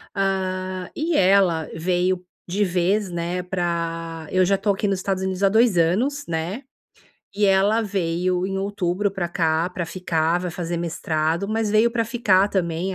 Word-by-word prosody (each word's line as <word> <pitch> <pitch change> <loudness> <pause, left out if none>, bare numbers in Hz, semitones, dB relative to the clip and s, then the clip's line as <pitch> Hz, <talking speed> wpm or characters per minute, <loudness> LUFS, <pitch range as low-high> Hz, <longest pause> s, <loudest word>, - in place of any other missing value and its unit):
Hã, 185 -1 -2
e 320 +2 -1
ela 185 -4 +3
veio 180 +2 0 0.2
de 195 +4 0
vez, 185 +2 +1
né, 175 +1 -3
pra 165 -3 -3
eu 185 0 +3
já 195 +2 +3
estou 200 +1 +1
aqui 205 - -2
nos 195 -2 0
Estados 190 0 -2
Unidos 190 +1 -2
há 195 - +5
2 220 -3 +3
anos, 240 - +1
né. 170 +8 -3 0.7
E 205 - +1
ela 200 +3 +3
veio 180 -2 -1
em 195 0 -3
outubro 195 0 -1
pra 180 -3 -3
cá 165 -1 +1
pra 180 -1 -4
ficar, 165 -1 0
vai 180 0 -4
fazer 170 0 -4
mestrado, 165 +1 -1
mas 220 -1 0
veio 220 +2 +4
pra 230 -1 0
ficar 210 -4 +2
também, 180 0 -1
185 Hz, 165 wpm, -23 LUFS, 170-200 Hz, 0.7 s, há